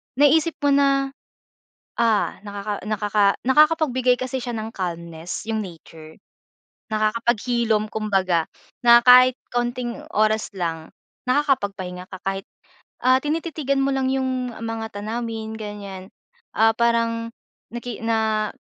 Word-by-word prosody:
naisip 305 Hz, +3 st, +4 dB
mo 285 Hz, -, +4 dB
na, 275 Hz, -1 st, +3 dB, 0.9 s
ah, 225 Hz, -3 st, +1 dB, 0.4 s
nakaka 210 Hz, 0 st, +1 dB, 0.2 s
nakakapag-bigay 265 Hz, -3 st, +3 dB
kasi 255 Hz, +1 st, -3 dB
siya 240 Hz, -2 st, -4 dB
ng 220 Hz, +1 st, -5 dB
calmness 170 Hz, -1 st, -5 dB
yung 220 Hz, -1 st, -2 dB
nature, 160 Hz, -4 st, -11 dB, 0.7 s
nakakapag-hilom 220 Hz, 0 st, 0 dB
kumbaga 190 Hz, -6 st, 0 dB, 0.3 s
na 235 Hz, 0 st, +7 dB
kahit 255 Hz, 0 st, +8 dB, 0.2 s
kaunting 240 Hz, 0 st, -2 dB, 0.2 s
oras 215 Hz, +1 st, +2 dB
lang, 165 Hz, -3 st, -3 dB, 0.4 s
nakakapagpahinga 200 Hz, -10 st, 0 dB
ka 190 Hz, -, -8 dB
kahit 195 Hz, 0 st, -3 dB, 0.6 s
ah, 255 Hz, +1 st, +5 dB
tinititigan 300 Hz, -2 st, -1 dB
mo 275 Hz, -, +1 dB
lang 265 Hz, -1 st, 0 dB
yung 260 Hz, -2 st, -1 dB
mga 225 Hz, 0 st, -4 dB
tanawin 220 Hz, +1 st, -4 dB
ganyan. 200 Hz, -3 st, -7 dB, 0.5 s
Ah, 225 Hz, +1 st, +5 dB
parang 230 Hz, 0 st, +1 dB, 0.4 s
naki 240 Hz, -1 st, -6 dB
na 220 Hz, -2 st, 0 dB
230 Hz, 110 wpm, -23 LUFS, 205-255 Hz, 0.9 s, kahit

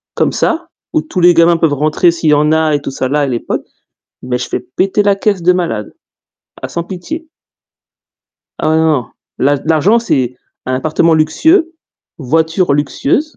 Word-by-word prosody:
comme -, -, +1 dB
ça, 335 Hz, 0 st, -1 dB, 0.3 s
où 315 Hz, -, +2 dB
tous 210 Hz, -12 st, -5 dB
les 175 Hz, 0 st, +6 dB
gamins 170 Hz, 0 st, +4 dB
peuvent 160 Hz, -3 st, +1 dB
rentrer 155 Hz, +4 st, +2 dB
s'il 165 Hz, -2 st, -1 dB
y -, -, +6 dB
en 150 Hz, +1 st, +3 dB
a 160 Hz, -1 st, +2 dB
et 145 Hz, -, -2 dB
tout 140 Hz, -, -5 dB
ça 130 Hz, -1 st, -2 dB
là, 145 Hz, +3 st, 0 dB
à -, -, +2 dB
l'époque, 120 Hz, -3 st, -3 dB, 0.6 s
mais 125 Hz, 0 st, -2 dB
je 125 Hz, -, -5 dB
fais -, -, -2 dB, 0.2 s
péter 195 Hz, +2 st, +2 dB
la 200 Hz, -1 st, +2 dB
caisse 200 Hz, -2 st, 0 dB
de 180 Hz, +2 st, +4 dB
malade. 170 Hz, -, -3 dB, 0.7 s
Ah -, -, -4 dB
sans 170 Hz, -, -4 dB
pitié. 310 Hz, -, -7 dB, 1.3 s
Ah -, -, +1 dB
ouais 160 Hz, -, +2 dB
non, 160 Hz, 0 st, +2 dB
non. 145 Hz, -7 st, 0 dB, 0.3 s
L'a 140 Hz, +2 st, +2 dB
l'argent 165 Hz, +8 st, +3 dB
c'est 130 Hz, -, -1 dB, 0.3 s
un 130 Hz, -, -1 dB
appartement 155 Hz, +4 st, +1 dB
luxueux, 320 Hz, -, +2 dB, 0.5 s
voiture 160 Hz, +3 st, +1 dB
luxueuse. 145 Hz, -, -1 dB
160 Hz, 185 wpm, -14 LUFS, 145-185 Hz, 1.3 s, les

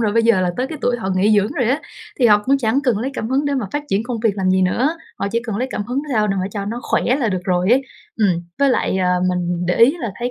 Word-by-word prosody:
rồi, 215 Hz, -3 st, +1 dB
bây 230 Hz, 0 st, +3 dB
giờ 225 Hz, -5 st, +4 dB
là 180 Hz, -1 st, +1 dB
tới 255 Hz, -, -1 dB
cái 310 Hz, +2 st, -7 dB
tuổi 245 Hz, 0 st, +1 dB
họ 195 Hz, -5 st, -4 dB
nghỉ 205 Hz, +3 st, +3 dB
dưỡng 205 Hz, +5 st, +1 dB
rồi 260 Hz, -, 0 dB
á. 285 Hz, -, 0 dB, 0.4 s
Thì 245 Hz, -, +4 dB
họ 210 Hz, -2 st, +6 dB
cũng 275 Hz, +1 st, +3 dB
chẳng 245 Hz, +2 st, +1 dB
cần 235 Hz, -5 st, +2 dB
lấy 260 Hz, +4 st, -2 dB
cảm 220 Hz, -, -3 dB
hứng 270 Hz, +3 st, +1 dB
để 285 Hz, -, 0 dB
mà 255 Hz, -6 st, -2 dB
phát 290 Hz, -, -2 dB
triển 195 Hz, +2 st, +1 dB
công 235 Hz, -2 st, -4 dB
việc 215 Hz, -3 st, +1 dB
làm 185 Hz, -1 st, +1 dB
gì 185 Hz, 0 st, +3 dB
nữa, 260 Hz, -, +1 dB, 0.2 s
họ 200 Hz, -, -1 dB
chỉ 235 Hz, -, +1 dB
cần 210 Hz, -3 st, -3 dB
lấy 255 Hz, +3 st, -2 dB
cảm 205 Hz, -, -3 dB
hứng 255 Hz, +5 st, -2 dB
sao 215 Hz, -2 st, +2 dB
để 195 Hz, -1 st, -1 dB
họ 185 Hz, -, -1 dB
cho 200 Hz, 0 st, -4 dB
nó 225 Hz, +4 st, -4 dB
khỏe -, -, 0 dB
là 255 Hz, -5 st, 0 dB
được 185 Hz, -2 st, -3 dB
rồi 180 Hz, +1 st, +1 dB
ấy. 265 Hz, +2 st, +4 dB, 0.3 s
Ừm. 185 Hz, -6 st, +1 dB, 0.2 s
Với 280 Hz, -1 st, +4 dB
lại, 190 Hz, -, 0 dB
à, 180 Hz, -1 st, +1 dB, 0.2 s
mình 175 Hz, -1 st, -1 dB
để 180 Hz, -, +1 dB
ý 255 Hz, +9 st, +5 dB
là 225 Hz, -7 st, -3 dB
thấy 245 Hz, +1 st, -2 dB
220 Hz, 315 wpm, -19 LUFS, 190-255 Hz, 0.4 s, họ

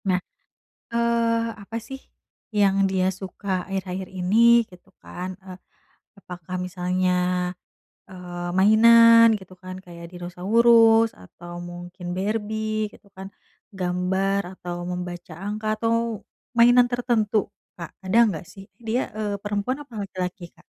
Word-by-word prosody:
Nah, 185 Hz, -1 st, +2 dB, 0.7 s
eee, 230 Hz, 0 st, +1 dB
apa 225 Hz, +3 st, -7 dB
sih 270 Hz, 0 st, -7 dB, 0.6 s
yang 195 Hz, -1 st, +4 dB
dia 185 Hz, -1 st, +1 dB
suka 190 Hz, +2 st, -9 dB, 0.2 s
akhir-akhir 190 Hz, -1 st, -4 dB
ini? 185 Hz, +4 st, +1 dB, 0.3 s
Gitu 180 Hz, +1 st, -18 dB
kan, 180 Hz, +1 st, -7 dB
eee, 185 Hz, -1 st, -10 dB, 0.6 s
apakah 180 Hz, -1 st, -8 dB
misalnya, 180 Hz, 0 st, -1 dB, 1.0 s
eee, 175 Hz, -1 st, -7 dB
mainan 230 Hz, +3 st, +7 dB
gitu 190 Hz, -1 st, -14 dB
kan, 185 Hz, 0 st, -7 dB
kayak 170 Hz, -1 st, -10 dB
dinosaurus, 225 Hz, +6 st, +4 dB
atau 175 Hz, -, -12 dB, 0.2 s
mungkin 175 Hz, 0 st, -9 dB
Barbie, 215 Hz, +1 st, -2 dB
gitu -, -, -19 dB
kan 190 Hz, 0 st, -7 dB, 0.5 s
gambar 190 Hz, +2 st, 0 dB, 0.2 s
atau 175 Hz, -1 st, -6 dB, 0.2 s
membaca 175 Hz, -1 st, -6 dB
angka 215 Hz, +1 st, -4 dB
atau 230 Hz, -1 st, -1 dB, 0.3 s
mainan 245 Hz, +1 st, +6 dB
tertentu 235 Hz, -3 st, 0 dB, 0.4 s
Kak, 170 Hz, -2 st, -7 dB
ada 190 Hz, +4 st, +1 dB, 0.2 s
gak 160 Hz, -, -7 dB
sih? 195 Hz, -, -11 dB, 0.2 s
Dia, 240 Hz, +4 st, +1 dB, 0.2 s
eee, 210 Hz, -2 st, -2 dB
perempuan 205 Hz, +5 st, -2 dB
apa 260 Hz, -, -20 dB
laki-laki 185 Hz, -1 st, -5 dB
Kak? -, -, -22 dB
195 Hz, 120 wpm, -24 LUFS, 180-225 Hz, 1.0 s, mainan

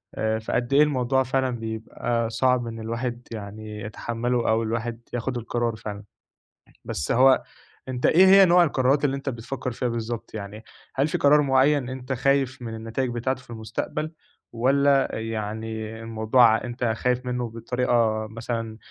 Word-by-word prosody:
آآ، 110 Hz, 0 st, 0 dB
فقدّ 120 Hz, +3 st, -2 dB
إيه 145 Hz, +2 st, +7 dB
الموضوع 130 Hz, -2 st, +1 dB
فعلًا 130 Hz, +1 st, 0 dB
بيبقى 115 Hz, +1 st, -2 dB
صعب 125 Hz, 0 st, +1 dB
إن 115 Hz, 0 st, -6 dB
الواحد 120 Hz, +2 st, -4 dB
يعني 105 Hz, 0 st, -7 dB
يتحمله 120 Hz, +3 st, -2 dB
أو 110 Hz, +1 st, +2 dB
الواحد 115 Hz, +1 st, -3 dB
ياخد 120 Hz, +1 st, -2 dB
القرار 120 Hz, 0 st, -2 dB
فعلًا. 105 Hz, -1 st, -7 dB, 0.8 s
بس 75 Hz, -, -2 dB
هو 130 Hz, +2 st, +5 dB, 0.4 s
أنت 125 Hz, -1 st, -2 dB
إيه 185 Hz, +4 st, +6 dB
هي 195 Hz, 0 st, +8 dB
نوع 175 Hz, 0 st, +6 dB
القرارات 140 Hz, -1 st, +2 dB
اللي 135 Hz, -1 st, +1 dB
أنت 135 Hz, 0 st, -4 dB
بتفكّر 125 Hz, +2 st, -5 dB
فيها 125 Hz, +2 st, -2 dB
بالضبط؟ 115 Hz, -1 st, -4 dB
يعني 105 Hz, +1 st, -7 dB, 0.3 s
هل 135 Hz, +3 st, +2 dB
في -, -, -1 dB
قرار 150 Hz, +1 st, +5 dB
مُعين 135 Hz, -1 st, +3 dB
أنت 130 Hz, 0 st, -4 dB
خايف 135 Hz, 0 st, +1 dB
مِن 115 Hz, -1 st, -5 dB
النتايج 115 Hz, +3 st, -3 dB
بتاعته 130 Hz, +2 st, -2 dB
في -, -, -24 dB
المستقبل، 115 Hz, +8 st, -4 dB, 0.4 s
والّا 135 Hz, +3 st, +3 dB
يعني 110 Hz, 0 st, -4 dB
الموضوع 115 Hz, +2 st, +3 dB
ع 110 Hz, 0 st, +2 dB
أنت 120 Hz, 0 st, -3 dB
خايف 125 Hz, +2 st, 0 dB
منُّه 125 Hz, -1 st, -2 dB
بطريقة 115 Hz, -2 st, 0 dB
مثلًا 115 Hz, 0 st, -5 dB
120 Hz, 155 wpm, -25 LUFS, 110-130 Hz, 0.8 s, هي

